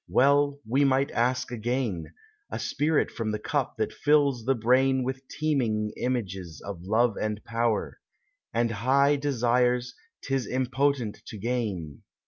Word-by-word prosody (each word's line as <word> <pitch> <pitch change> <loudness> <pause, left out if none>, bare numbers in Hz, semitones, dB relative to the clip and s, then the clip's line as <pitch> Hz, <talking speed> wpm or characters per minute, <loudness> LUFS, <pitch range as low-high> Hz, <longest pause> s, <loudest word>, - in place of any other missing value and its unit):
Well 140 +1 +3
might 135 +3 +3
we - - -11
ask 125 +2 0
again— 120 -7 -2 0.4
A - - -4
spirit 150 +2 0
from 115 -2 -3
the 105 - -1
cup 105 - -2
that - - -1
fills 140 -5 +2
the 135 +1 +3
brain 130 +3 +3
With 130 +1 -4
teeming 115 -9 0
images 95 - -3
of 100 -4 -7
love 110 +4 +2
and 105 -1 -2
power, 115 -1 -1 0.5
And 115 0 +1
high 135 +6 +3
desires 125 -2 +1 0.3
'tis 135 -2 -1
impotent 130 -2 0
to 110 - -7
gain? 100 - -3
125 Hz, 135 wpm, -27 LUFS, 110-135 Hz, 0.5 s, Well